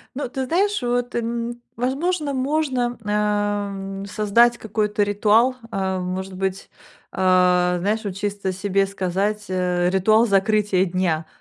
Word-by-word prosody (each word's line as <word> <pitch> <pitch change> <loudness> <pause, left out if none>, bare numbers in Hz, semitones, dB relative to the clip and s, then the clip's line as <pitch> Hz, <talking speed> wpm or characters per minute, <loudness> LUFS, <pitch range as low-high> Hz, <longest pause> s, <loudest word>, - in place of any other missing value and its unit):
Ну, 280 -3 -3
ты 265 0 -3
знаешь, 395 +2 +1
вот, 245 0 -1
м, 235 0 -3 0.2
возможно 285 +5 -1
можно, 260 -3 -1
э, - - -7
м, 205 -2 -1
создать 230 +4 +3
какой-то 210 -1 -1
ритуал. 215 +5 +3 0.2
Э, 190 -2 -1
может 185 +1 -4
быть, 190 0 -3 0.4
э, - - -11 0.6
знаешь, 215 +4 -1
вот 195 -2 -4
чисто 200 -1 -2
себе 195 +1 0
сказать, 195 +2 -2
э, 180 -1 0
ритуал 215 +5 +4
закрытия 200 -1 +2
дня. 170 -3 -1
205 Hz, 130 wpm, -22 LUFS, 195-240 Hz, 0.6 s, ритуал